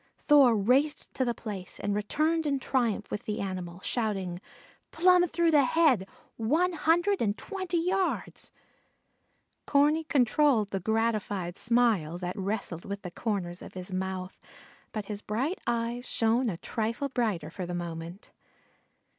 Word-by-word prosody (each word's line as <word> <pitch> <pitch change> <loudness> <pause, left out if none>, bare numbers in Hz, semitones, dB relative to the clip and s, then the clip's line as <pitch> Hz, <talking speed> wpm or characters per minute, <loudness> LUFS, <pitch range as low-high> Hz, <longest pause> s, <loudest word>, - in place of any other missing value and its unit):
Thor 275 -6 +5
raced 260 +9 +1
to 260 - 0
the 240 -2 -1
place 195 -5 -7
and 205 - -1
returned 305 +10 0
in 280 -1 +1
triumph 240 -6 -1
with 205 - -4
the 210 - -3
animal, 185 -2 -5
shouting: 195 -7 -2 0.5
"Plumb 360 +1 +4
through 340 0 +2
the 290 -3 +5
head 255 - +3 0.3
one 315 +11 +1
hundred 345 +5 +2
and 205 -2 +1
twenty 375 -4 -3
yards." 365 +3 -1 1.2
Corney 295 +3 +3
controlled 265 -5 +3
the 195 - -1
gratified 210 -4 -1
smile 225 -9 +2
that 180 0 -4
wrestled 195 -4 -3
with 200 0 -6
the 180 - -6
corners 185 -5 -3
of - - -11
his 185 +1 -6
mouth, 185 0 -4 0.5
but 215 -3 -4
his 205 0 -6
bright 260 - -2
eyes 235 +1 -1
shone 230 +2 +2
a 175 - -4
trifle 230 +8 -2
brighter 215 - -1
for 180 0 -5
the 175 - -3
moment. 170 +2 -6
225 Hz, 145 wpm, -29 LUFS, 190-285 Hz, 1.2 s, Thor